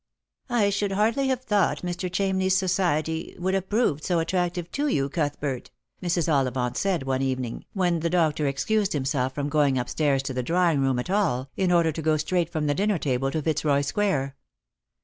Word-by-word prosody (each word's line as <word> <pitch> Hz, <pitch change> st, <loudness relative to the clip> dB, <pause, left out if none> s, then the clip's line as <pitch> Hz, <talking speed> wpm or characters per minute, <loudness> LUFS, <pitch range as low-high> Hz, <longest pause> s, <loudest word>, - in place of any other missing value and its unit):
" -, -, -63 dB
I 220 Hz, -5 st, +2 dB
should 200 Hz, 0 st, -1 dB
hardly 225 Hz, +7 st, +1 dB
have 260 Hz, -1 st, -1 dB
thought 205 Hz, -6 st, +1 dB
Mr. 175 Hz, +1 st, -3 dB
Chamney's 190 Hz, 0 st, +1 dB
society 170 Hz, -4 st, 0 dB
would 185 Hz, +2 st, -1 dB
have 195 Hz, -1 st, -1 dB
proved 205 Hz, -, +1 dB
so 175 Hz, -, +1 dB
attractive 175 Hz, +1 st, -1 dB
to 290 Hz, +1 st, -1 dB
you, 140 Hz, -, 0 dB
Cuthbert," 145 Hz, -4 st, -2 dB, 0.3 s
Mrs. 175 Hz, -2 st, 0 dB
Ollivant 130 Hz, -5 st, 0 dB
said 190 Hz, -7 st, 0 dB
one 135 Hz, 0 st, -1 dB
evening, 130 Hz, -3 st, -3 dB
when 180 Hz, -4 st, +1 dB
the 170 Hz, +1 st, -1 dB
doctor 160 Hz, -4 st, +1 dB
excused 200 Hz, +9 st, 0 dB
himself 130 Hz, -2 st, -1 dB
from 145 Hz, -1 st, -2 dB
going 145 Hz, -3 st, +2 dB
up 125 Hz, -1 st, -2 dB
stairs 140 Hz, -3 st, +1 dB
to 135 Hz, -, -4 dB
the 130 Hz, -, -1 dB
drawing 170 Hz, +2 st, +2 dB
room 135 Hz, -2 st, +1 dB
at 125 Hz, +9 st, -3 dB
all, 140 Hz, -10 st, 0 dB
in 185 Hz, -2 st, +1 dB
order 170 Hz, -2 st, +4 dB
to 160 Hz, -, -5 dB
go 155 Hz, 0 st, +2 dB
straight 165 Hz, +2 st, 0 dB
from 155 Hz, -2 st, -1 dB
the 145 Hz, -, +2 dB
dinner 200 Hz, +3 st, +1 dB
table 135 Hz, -3 st, 0 dB
to 155 Hz, +2 st, -2 dB
Fitzroy 150 Hz, -2 st, +1 dB
square. 140 Hz, -4 st, -1 dB
160 Hz, 195 wpm, -25 LUFS, 140-190 Hz, 0.3 s, order